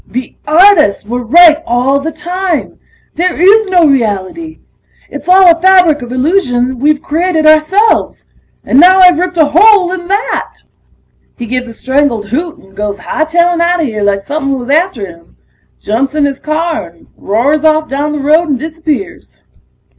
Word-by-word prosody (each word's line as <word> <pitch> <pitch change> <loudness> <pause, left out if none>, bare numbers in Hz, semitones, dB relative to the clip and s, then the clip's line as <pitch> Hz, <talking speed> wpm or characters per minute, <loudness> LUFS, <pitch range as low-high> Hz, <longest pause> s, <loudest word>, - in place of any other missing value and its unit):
"The 255 +1 -7
artists 310 - +3
were 245 +3 -4
right 320 +5 +5
all 255 +1 0
the 315 +3 -5
time... 355 +1 -4 0.3
there 360 +1 -2
is 415 +4 +4
no 360 -3 +2
reality! 270 - -2 0.5
It's 285 +4 -8
all 365 -2 +5
a 330 - -15
fabric 360 -6 +3
of 245 0 -9
illusion 255 -3 -1
we've 295 +2 0
created 325 +1 -1
ourselves! 310 +8 +1 0.4
And 260 - +1
now 370 +3 +6
I've 360 -3 +5
ripped 360 -1 -3
a 315 - +4
hole 390 0 +4
in 360 -2 -6
that!" 405 +4 -3 0.8
He 240 - -6
gives 250 +2 -4
a 230 - -10
strangled 260 -6 -2
hoot 325 - -4
and 195 0 -21
goes 205 -1 -4
hightailin' 340 +2 -1
outta 345 0 0
here 220 -7 -4
like 200 -1 0
somepin' 275 +3 -3
was 250 +1 -6
after 310 - 0
him. 170 -2 -16 0.4
Jumps 265 +7 -3
in 300 -2 +1
his 275 -1 -4
car 320 +1 -3
and 170 0 -21
roars 270 +9 -1
off 310 0 +1
down 285 +2 -3
the - - -3
road 315 +3 +2
and 275 - 0
disappears. 320 +4 -6
310 Hz, 165 wpm, -11 LUFS, 255-350 Hz, 0.8 s, now